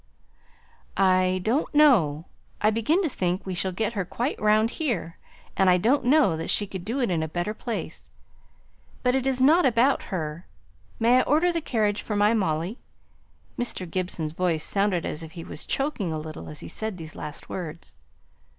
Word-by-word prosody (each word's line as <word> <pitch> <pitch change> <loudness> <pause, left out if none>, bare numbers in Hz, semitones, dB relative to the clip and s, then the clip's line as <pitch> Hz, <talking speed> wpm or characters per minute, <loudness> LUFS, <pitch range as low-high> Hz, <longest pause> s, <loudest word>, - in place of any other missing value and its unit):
"I 185 -1 +3
don't 265 - 0
know. 175 - +4 0.3
I 215 - +3
begin 265 - +1
to - - +2
think 180 -6 -2
we 190 - -3
shall 190 +1 -1
get 220 +5 -2
her 200 -4 -1
quite 240 - -3
round 215 +2 +3
here; 205 - -3 0.4
and 190 -1 +4
I 180 - +5
don't 245 +8 +2
know 260 - +4
that 160 - -4
she 205 - +1
could 190 -2 -7
be 220 +5 -4
in 175 -8 0
a 160 - -1
better 175 +6 -2
place. 230 +1 -6 0.9
But 250 -1 +3
it's 265 0 0
not 310 +7 +5
about 255 +1 +3
her. 165 -3 -4 0.5
May 240 +2 +5
I - - +5
order 315 +7 +3
the 335 - -1
carriage 215 -7 0
for 210 - -4
my 205 +2 +4
Molly?" 180 0 -1 0.8
Mr. 240 -6 -2
Gibson's 170 -3 -3
voice 165 -3 0
sounded 195 -4 0
as 150 - -4
if 160 -1 -10
he 165 - -7
was - - -9
choking 270 - -1
a 155 - -2
little 155 0 -7
as 150 - -9
he - - -8
said 215 +2 -4
these 160 -2 -9
last 150 -1 -8
words. 170 -3 -7
200 Hz, 180 wpm, -25 LUFS, 175-245 Hz, 0.9 s, I